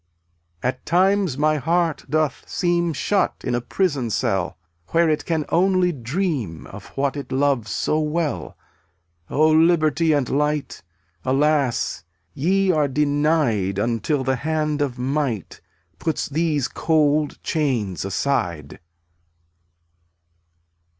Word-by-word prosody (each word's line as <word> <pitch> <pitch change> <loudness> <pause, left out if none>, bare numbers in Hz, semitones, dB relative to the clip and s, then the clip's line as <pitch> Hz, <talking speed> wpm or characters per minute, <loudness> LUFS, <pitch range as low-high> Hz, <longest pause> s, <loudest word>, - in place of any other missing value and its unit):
268 - - +1
At - - -40
times 185 -4 +2
my 155 +1 +2
heart 165 +2 0
doth 155 -2 0
seem 175 -1 +1
Shut 195 +6 0
in - - -1
a 120 - 0
prison 140 -4 -1
cell, 95 -3 -1 0.3
Where 165 0 +3
it 155 -1 0
can 160 -3 -1
only 185 0 +3
dream 130 - -3
Of 100 0 -11
what 140 0 0
it 140 - -6
loves 135 -4 +1
so 155 - 0
well. 155 0 -2 0.7
O 155 +2 +3
liberty 160 -1 +3
and 145 -4 +1
light! 150 +1 -1 0.4
Alas, 140 -1 +1 0.3
ye 190 +6 +2
are 155 -4 +2
denied 145 - +1
Until 120 +6 0
the 130 0 0
hand 155 +1 -1
of 135 -4 -1
Might 130 - -2 0.4
Puts 160 - -1
these 150 -3 0
cold 150 +2 +1
chains 125 - -1
aside. 90 - -2
150 Hz, 115 wpm, -22 LUFS, 130-160 Hz, 0.7 s, Where